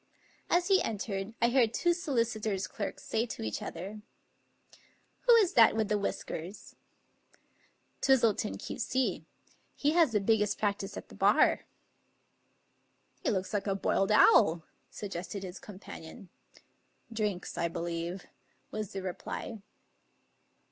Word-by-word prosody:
As 350 0 +3
he 385 -1 +5
entered 205 -1 -3
I 235 - +4
heard 240 -3 +3
two 345 0 +3
solicitors' 230 - -1
clerks 205 - -5
say 225 +2 -1
to 220 - -6
each 110 -1 -3
other: 195 +5 -6 0.6
" - - -29
Who 480 - +9
is 420 -6 +4
that 230 -2 +6
with 220 -2 0
the 210 - +2
whiskers? 190 -1 -5 0.6
" - - -36
"Twistleton, 230 - +3
Q.C.; 260 - -2 0.5
he 295 - +1
has 325 -5 +4
the 210 - +2
biggest 210 0 +2
practice 200 -2 -2
at - - -9
the - - -13
bar." - - +3 0.8
" - - -42
He - - +1
looks 190 0 -1
like 205 0 -1
a 195 - +1
boiled 195 +1 +1
owl," 165 -5 +6 0.3
suggested 195 0 -6
his 185 0 -7
companion. 195 0 -11 0.4
" 235 - -21
Drinks, 210 -5 -2
I 170 - 0
believe," 170 +2 -4 0.5
was 215 -2 -4
the 195 -1 -4
reply. 190 +4 -5
210 Hz, 135 wpm, -31 LUFS, 190-230 Hz, 0.8 s, Who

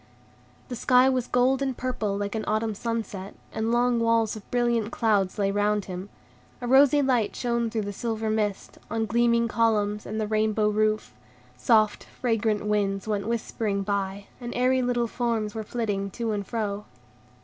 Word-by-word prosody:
The 250 - -4
sky 250 +2 +4
was 255 -2 0
gold 255 +2 +2
and 265 -3 -1
purple 220 -6 -2
like 205 0 -3
an 220 -1 -2
autumn 215 +1 0
sunset, 210 -3 -4 0.2
and 220 +1 -1
long 240 0 +2
walls 230 -1 +2
of 215 - -11
brilliant 235 -2 +1
clouds 210 -6 +1
lay 200 -1 +1
round 205 0 +1
him. 185 +1 -6 0.5
A 245 - -5
rosy 280 +3 +5
light 245 -5 +1
shone 235 -1 0
through 220 -1 -2
the 205 0 -4
silver 220 0 -2
mist, 210 -2 -2
on 225 0 -1
gleaming 235 +1 +2
columns 210 -2 +1
and 215 +1 -3
the 215 - 0
rainbow 215 0 +1
roof; 215 0 0 0.4
soft, 215 -4 +3
fragrant 225 -3 -1
winds 200 -1 0
went 210 -1 -1
whispering 220 -3 -2
by, 200 0 -2
and 240 -1 -6
airy 255 +1 +3
little 245 -1 +1
forms 230 -3 -1
were 220 - -3
flitting 205 -3 -2
to 230 +3 -3
and 200 -2 -3
fro. 210 -3 -3
220 Hz, 170 wpm, -26 LUFS, 205-235 Hz, 0.5 s, rosy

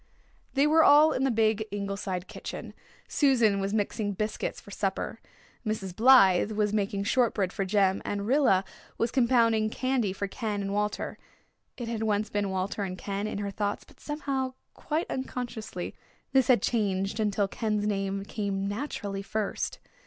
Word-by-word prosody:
They 275 +2 +4
were 315 +2 +5
all 300 +2 +7
in 265 -2 0
the - - +3
big 220 -2 +2
Ingleside 200 -2 -3
kitchen. - - -7 0.3
Susan 235 -8 +3
was 195 0 -1
mixing 205 0 -1
biscuits 215 +3 -3
for 205 - -14
supper. 195 +3 -2 0.4
Mrs. 205 -5 -3
Blythe 215 -5 +6
was 210 -1 0
making 200 -1 0
shortbread 205 -4 +1
for 195 - -1
Jem, 195 -1 +2
and 200 0 -3
Rilla 245 -7 +4 0.3
was 230 0 0
compounding 230 -4 +3
candy 255 -4 0
for 200 +1 -3
Ken 210 0 -3
and 195 0 -3
Walter 210 0 -2 0.6
it 240 - -5
had 230 -1 -3
once 215 -1 0
been 205 -1 0
"Walter 190 +2 -2
and 185 -2 -3
Ken" 200 +2 -3
in 215 - -4
her 200 0 -3
thoughts 205 0 -2
but - - -21
somehow, 275 -3 -3 0.2
quite 315 +2 -2
unconsciously, 235 -8 -5 0.4
this 265 -2 +4
had 245 -6 +4
changed 200 -2 0
until 205 -2 +1
Ken's 210 0 -1
name 195 -1 -1
came 200 -2 -2
naturally 205 -3 -4
first. 210 +1 -2
210 Hz, 160 wpm, -28 LUFS, 200-235 Hz, 0.6 s, all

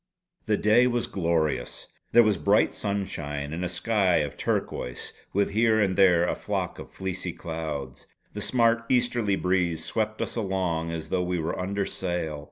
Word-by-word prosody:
The 105 -1 +2
day 115 +4 +5
was 120 -1 0
glorious. 80 -8 -1 0.3
There 120 - +7
was 105 -3 +2
bright 100 +1 +3
sunshine; 75 -8 -3
and 85 +3 -3
a 90 - -1
sky 95 -1 +1
of 75 -3 0
turquoise 60 -1 -3 0.2
with 100 +1 +1
here 110 +1 +3
and 95 -3 +2
there 90 -3 +5
a - - +1
flock - - -3
of - - -10
fleecy 95 -2 -4
clouds. 75 -6 -5 0.3
The - - -5
smart 115 -2 +2
easterly 120 -5 +2
breeze 90 -4 0
swept 110 -1 -1
us - - -3
along 95 -6 -1
as 80 -1 -5
though 90 - +1
we 90 0 -1
were 80 0 -2
under 100 +2 -1
sail. 85 -5 -3
95 Hz, 170 wpm, -26 LUFS, 85-105 Hz, 0.3 s, There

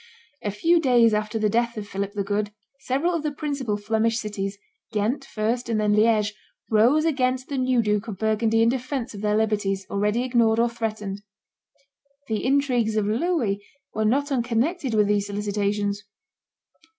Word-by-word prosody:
A 210 - -2
few 330 - +3
days 240 -6 +4
after 210 +1 -1
the 215 -1 +2
death 235 +2 0
of 205 -1 -5
Philip 200 0 -4
the 205 -2 -1
Good, 205 +1 -1 0.3
several 280 +8 0
of 335 - -1
the 300 0 -2
principal 280 -7 -2
Flemish 220 +2 0
cities, 200 -3 -4 0.3
Ghent 225 +6 0
first 235 0 -2
and 225 -2 +1
then 210 -1 +2
Liege, 215 -1 +3 0.4
rose 245 +9 +4
against 255 -4 0
the 280 - -2
new 255 -2 +2
Duke 210 +1 0
of 210 -4 -5
Burgundy 220 +2 +2
in 230 - +4
defence 255 0 -3
of 200 - -8
their 210 0 +1
liberties, 205 -3 0
already 210 +4 +1
ignored 235 -3 +2
or 235 +1 +3
threatened. 215 -4 -4 1.1
The 220 -2 -2
intrigues 255 -5 +1
of 215 -2 +1
Louis 225 - 0 0.3
were 220 - -1
not 280 +7 +1
unconnected 250 +3 0
with 210 -1 +4
these 205 0 +1
solicitations. 205 0 -1
220 Hz, 165 wpm, -24 LUFS, 210-255 Hz, 1.1 s, days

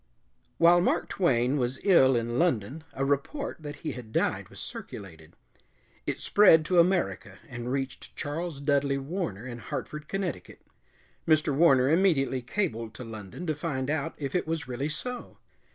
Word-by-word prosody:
While 175 +1 +6
Mark - - +1
Twain 130 -6 +2
was 130 0 -1
ill 135 -10 +6
in 120 +1 -1
London 150 - 0
a 135 - -1
report 145 - -1
that 145 -1 -6
he - - -1
had 120 -3 -9
died - - 0
was - - -12
circulated. 80 -6 -9 0.7
It - - -2
spread 165 -6 +6
to 175 +2 +3
America 180 +1 +1
and 120 -2 -5
reached 135 -2 -4
Charles 155 +1 -4
Dudley 140 -1 +1
Warner 135 - -4
in 120 -2 -6
Hartford, 150 +5 -6
Connecticut. 190 - -4 0.6
Mr. 155 -2 +3
Warner 135 -5 +5
immediately 150 -6 +2
cabled 115 - -2
to 125 - -7
London 110 - -8
to 155 - 0
find 145 -3 -2
out 155 -2 -2
if 140 -2 -4
it 180 - 0
was 160 -1 -2
really 130 +4 -3
so. 250 +10 -5
140 Hz, 155 wpm, -28 LUFS, 125-170 Hz, 0.7 s, While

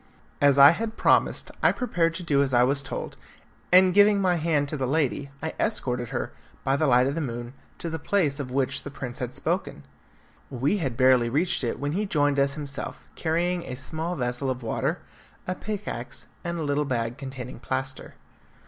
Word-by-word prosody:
As 140 -1 +5
I 140 +1 +10
had 225 +5 -4
promised - - +2
I - - +5
prepared 165 -9 0
to 180 - -5
do 145 -4 +2
as 135 -2 +1
I 120 - +6
was 135 +2 +2
told, - - -6 0.6
and 185 0 +6
giving 205 +1 +6
my 180 -2 +2
hand 155 -3 +1
to 155 - -3
the 135 -3 -1
lady, 140 -1 0
I 160 - -2
escorted 125 - -1
her, - - -3 0.3
by 135 - +2
the 155 +2 +1
light 125 -1 +5
of 135 - 0
the 165 - -2
moon, 120 -2 -5 0.2
to - - -4
the 160 0 -3
place 150 -5 0
of 135 -3 -4
which 130 0 0
the - - -7
prince 130 -3 -7
had 125 -1 -4
spoken. - - -2 0.7
We 135 - 0
had 135 -10 -3
barely 130 -2 +4
reached 150 +4 +1
it 120 - -1
when 145 +1 -2
he 200 +6 -1
joined 145 -5 +2
us 140 0 +2
himself, 145 -2 -5
carrying 175 +2 0
a 125 - -5
small 160 +6 -4
vessel 125 -1 -2
of 130 -1 -3
water, 115 - -1 0.5
a 185 - -1
pickaxe, 195 - -5 0.2
and 170 0 -3
a 165 - -2
little 145 0 0
bag 120 -2 -2
containing 130 -2 -7
plaster. 130 0 -4
140 Hz, 195 wpm, -26 LUFS, 130-165 Hz, 0.7 s, I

